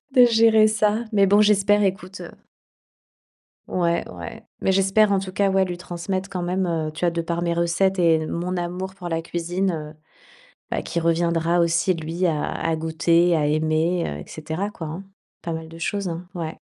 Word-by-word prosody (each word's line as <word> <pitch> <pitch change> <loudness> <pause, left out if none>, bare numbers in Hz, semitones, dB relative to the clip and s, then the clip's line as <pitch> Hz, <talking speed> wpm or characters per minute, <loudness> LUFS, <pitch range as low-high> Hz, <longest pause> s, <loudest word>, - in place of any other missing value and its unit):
de 250 -1 +8
gérer 225 -2 +5
ça. 215 +1 +1
Mais 200 -1 +4
bon, 205 +2 +5
j'espère, 205 0 +4
écoute, 190 0 -2
heu - - -9 1.4
Ouais, 170 -1 0
ouais, 85 -2 -9 0.2
mais 190 - +1
j'espère, 195 +2 +3
en 195 - +3
tout 190 -1 -6
cas, 200 0 +1
ouais, 190 0 +3
lui 175 -1 -5
transmettre 185 +2 -4
quand 180 -2 -4
même, 180 +2 -1
heu, 160 -2 -1
tu 155 - -10
vois, 170 - +2
de 170 0 -2
par 170 +1 -3
mes 170 0 0
recettes 180 +3 +1
et 160 -2 +3
mon 180 +3 -3
amour 180 +2 -4
pour 180 -3 -7
la 165 -1 -1
cuisine, 175 +3 -2
heu, 155 -1 -6 0.8
bah, - - -1
qu'il 170 - -3
reviendra 170 +1 +1
aussi, 170 +2 +2
lui 165 +2 -3
à 155 -4 0
à 165 0 -1
goûter, 165 +2 +2
à 150 - +1
aimer, 155 +3 +1
heu, 75 - -4
et - - -10
cetera, 160 +6 -4
quoi, 165 -6 -7
hein. 170 +6 -6 0.4
Pas 170 - -4
mal 160 0 -6
de 165 - -11
choses, 200 +2 -2
hein. 170 +2 -6
Ouais. 160 -2 -5
175 Hz, 200 wpm, -23 LUFS, 165-195 Hz, 1.4 s, de